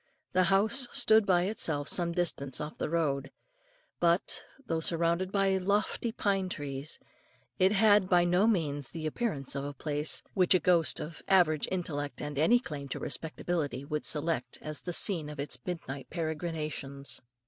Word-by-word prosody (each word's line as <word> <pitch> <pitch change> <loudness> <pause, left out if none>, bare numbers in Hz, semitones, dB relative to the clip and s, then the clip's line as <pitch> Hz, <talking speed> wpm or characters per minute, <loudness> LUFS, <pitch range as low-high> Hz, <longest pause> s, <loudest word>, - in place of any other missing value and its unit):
The 185 0 +4
house 215 +7 +3
stood 220 -1 +4
by 175 -2 +4
itself 160 -7 -1
some 170 -2 +2
distance 155 -7 0
off 150 +1 -6
the - - -2
road, 140 -5 0 0.7
but, 170 +1 +2 0.2
though 165 -5 -1
surrounded 170 +3 +1
by 195 -1 +2
lofty 205 +4 0
pine 195 -4 0
trees, 145 -2 -3 0.6
it 190 +1 +5
had 205 -2 +4
by 175 -1 +4
no 180 +5 +3
means 145 - 0
the 160 -2 -6
appearance 155 - -2
of 140 0 -3
a 145 0 -5
place, 150 +2 +1
which 185 -1 +4
a - - +4
ghost 175 -3 +3
of 155 +1 -7
average 170 -6 +3
intellect 145 -6 -3
and 145 -1 -4
any 230 +11 +5
claim 150 - -7
to - - -4
respectability 155 -2 -3
would 150 +1 -3
select, 150 -4 0
as 155 -1 -6
the 175 - -4
scene 170 -3 +2
of 150 -1 -9
its 140 -3 -2
midnight 140 -6 -5
peregrinations. 155 -4 -4
165 Hz, 160 wpm, -30 LUFS, 145-185 Hz, 0.7 s, it